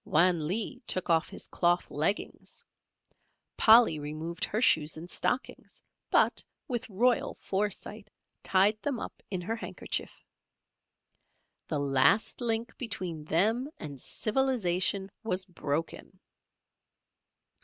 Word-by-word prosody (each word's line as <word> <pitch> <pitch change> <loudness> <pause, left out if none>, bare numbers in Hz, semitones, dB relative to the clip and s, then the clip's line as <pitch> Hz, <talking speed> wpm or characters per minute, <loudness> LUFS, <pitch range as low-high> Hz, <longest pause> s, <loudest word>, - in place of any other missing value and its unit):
Wan 170 -1 +3
Lee 225 - -1
took 185 -2 0
off 165 +1 +2
his - - -9
cloth 175 0 +1
leggings, 155 +8 -3 0.9
Polly 220 -8 +6
removed 155 +4 -5
her 215 - -2
shoes 155 -10 +3
and 165 +2 -8
stockings, 250 +7 -3 0.3
but - - +3 0.2
with 240 -4 -3
royal 235 +5 +1
foresight, 205 +1 -3 0.3
tied 205 +3 +2
them 280 -5 -2
up - - -8
in 185 -3 -3
her 220 +6 -3
handkerchief. 230 - -5 1.4
The 155 - -2
last 140 - +2
link 230 0 0
between 180 - -4
them 220 - +1
and 140 -4 -8
civilization 200 -6 +1
was 185 -4 -1
broken. 165 -3 -4
190 Hz, 110 wpm, -29 LUFS, 160-225 Hz, 1.4 s, Polly